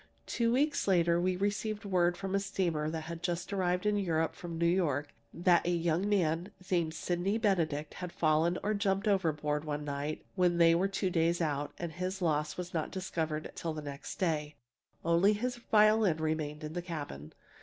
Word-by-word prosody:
Two 230 -1 +1
weeks 290 +2 +1
later 170 -2 +3
we 185 +1 +1
received 205 +2 -2
word 175 -2 +2
from 195 0 -4
a 200 - +3
steamer 175 -6 -1
that 160 0 -3
had 165 +1 -7
just 175 +2 -2
arrived 180 -1 0
in 210 0 +2
Europe 165 -5 0
from 170 0 -7
New 170 - +1
York, 150 -5 +1 0.2
that 175 0 +3
a - - -1
young 170 +2 +1
man 175 -2 +1 0.2
named 170 -3 +1
Sydney 180 +5 0
Benedict 165 -9 0
had 180 -1 -6
fallen 160 +2 +2
or 210 - +1
jumped 200 0 0
overboard 150 -6 +1
one 150 -1 -3
night 145 +1 -4
when 180 -2 +2
they 165 -1 +6
were 180 +3 +2
two 195 -1 -1
days 170 0 +2
out, 145 -3 -1
and 170 -1 -4
his 185 +4 -3
loss 150 -4 0
was 180 0 -5
not 160 -2 -1
discovered 160 -5 -3
till 165 -2 -4
next 145 -2 -6
day. 150 -4 -1 0.5
Only 170 +5 +4
his 245 +4 -2
violin 215 -6 +4
remained 155 -1 -2
in 155 +1 -5
the 175 - -2
cabin. 145 - -6
170 Hz, 185 wpm, -32 LUFS, 155-190 Hz, 0.5 s, they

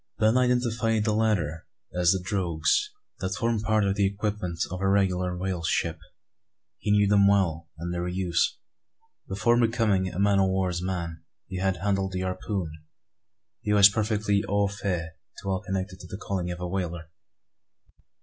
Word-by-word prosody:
Ben 110 +2 +3
identified 120 -3 +2
the 110 - +2
latter 95 -8 0 0.3
as 90 -1 +2
the 95 0 +2
"drogues," 95 - +1 0.3
that 95 0 -2
form 115 0 0
part 110 0 +2
of 100 -1 +2
the 100 -1 +2
equipment 100 -3 -3
of 90 0 -4
a 95 - +1
regular 90 -2 +1
whale 95 -1 -2
ship. 80 0 0 0.8
He - - -3
knew 105 0 +5
them 100 0 +5
well, 85 -5 +1
and 85 +2 -4
their 90 0 -2
use. 90 -1 0 0.7
Before 110 +5 +2
becoming 110 -5 +2
a - - -7
man 100 0 +3
o' 95 - +4
war's 95 -2 0
man, 85 -3 -4 0.2
he 95 - -6
had 95 -1 +1
handled 95 0 -1
the 90 - -2
harpoon; 95 -1 -3 0.9
and 105 0 +1
was 100 -1 +9
perfectly 105 -1 0
au 100 0 +2
fait 95 -5 -3 0.3
to - - -7
all 95 - -1
connected 95 0 -4
with 90 - -11
the 95 - -6
calling 95 -4 -3
of 90 0 -5
a 90 - -3
whaler. 85 -3 -4
95 Hz, 170 wpm, -27 LUFS, 90-105 Hz, 0.9 s, was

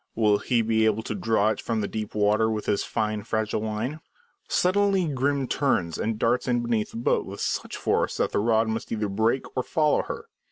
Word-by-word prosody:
Will 105 -2 +3
he 120 -3 +1
be 110 0 +2
able 110 0 +1
to - - -3
draw 105 +1 +2
it 110 - -2
from 115 -2 -1
the 100 - -1
deep 110 -1 -5
water 105 +1 +3
with 110 -1 -2
his 100 - +1
fine, 110 -1 -2
fragile 110 0 -1
line? 110 +7 -3 0.5
Suddenly 195 0 +2
Grim 140 -1 0
turns 95 - 0
and 110 0 -1
darts 120 +4 +1
in 120 -1 +1
beneath 115 -3 0
the - - -8
boat 115 - +1
with - - -9
such - - -2
force - - 0
that - - 0
the - - +1
rod 110 +1 +2
must 110 0 -3
either 105 -2 -1
break 110 +6 0
or 130 - +1
follow 150 +3 +2
her. - - -6
110 Hz, 210 wpm, -26 LUFS, 105-125 Hz, 0.5 s, Will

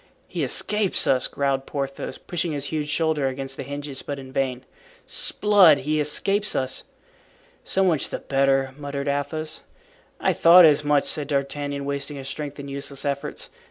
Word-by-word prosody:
"He - - -3
escapes 210 -2 +2
us," 130 -1 +3
growled 135 -1 -1
Porthos, 140 -1 -4
pushing 170 -2 -3
his 145 -1 -1
huge 150 -1 -2
shoulder 155 -2 +1
against 135 0 -4
the - - -6
hinges, 140 0 -5
but 145 - -5
in 130 -1 -10
vain. 130 -2 -2 0.4
"'Sblood! 200 -8 +4
he 155 +3 0
escapes 195 +8 0
us." 130 -1 -1 0.8
"So 195 - +1
much 170 -6 +1
the - - -3
better," 135 -1 +1
muttered 140 -1 -4
Athos. 145 +2 -2 0.6
"I - - +2
thought 170 +1 +8
as 150 -1 +4
much," 145 -1 +3
said 150 -3 -1
D'Artagnan, 140 0 -2
wasting 140 +1 -3
his 135 -1 -7
strength 145 0 -6
in 140 - -7
useless 140 0 -5
efforts. 140 +1 -4
145 Hz, 160 wpm, -24 LUFS, 135-155 Hz, 0.8 s, thought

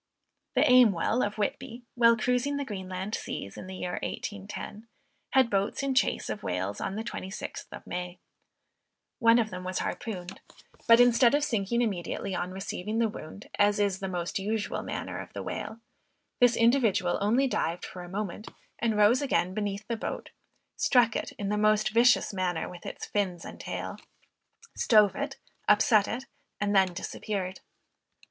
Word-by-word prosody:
The - - +5
Aimwell 240 -2 +5
of 205 +1 -2
Whitby, 240 +3 -3
while 230 -1 +5
cruising 250 +4 0
the 285 - -2
Greenland 190 -2 -5
seas, 100 - -4
in - - -8
the 190 - -7
year 180 -1 -3
1810, 205 +1 -6 0.5
had 265 -2 +5
boats 200 +6 0
in 275 -1 0
chase 260 - +1
of 210 - -4
whales 95 +3 -3
on 195 - -3
the 220 - -3
26th 195 -4 -6
of - - -9
May. 180 0 -5 1.0
One 230 0 +6
of 220 -3 +1
them 180 0 -6
was 185 0 -3
harpooned. 190 -5 -4 0.5
But 230 0 +8
instead 245 +1 +6
of 290 - +1
sinking 235 -2 0
immediately 195 -2 -3
on 180 0 -2
receiving 190 +2 -4
the 230 -1 +2
wound, 200 0 -9
as 205 0 +4
is 200 -2 +1
the 195 - -3
most 175 0 -2
usual 205 0 -2
manner - - -5
of - - -9
the - - -5
whale, 220 - -5 0.6
this 245 -1 +5
individual 230 -7 +3
only 235 +7 +3
dived 175 -9 -1
for 180 - -8
a 175 - -9
moment, 205 +1 -4 0.3
and 225 -3 +1
rose 210 +5 +5
again 185 -10 +1
beneath 205 0 -3
the 230 - -2
boat, - - -5 0.5
struck 240 -4 +4
it - - -2
in 200 -1 -4
the 210 0 0
most 215 0 +3
vicious 235 -1 +4
manner 185 -3 -1
with 175 -1 -9
its - - -6
fins 185 -5 -2
and - - -9
tail, - - -5 0.8
stove 210 -4 +5
it, 280 0 -4 0.3
upset 210 0 +5
it, 255 +4 -4 0.3
and 205 0 0
then 190 -1 +5
disappeared. 190 +1 -4
210 Hz, 165 wpm, -28 LUFS, 185-235 Hz, 1.0 s, But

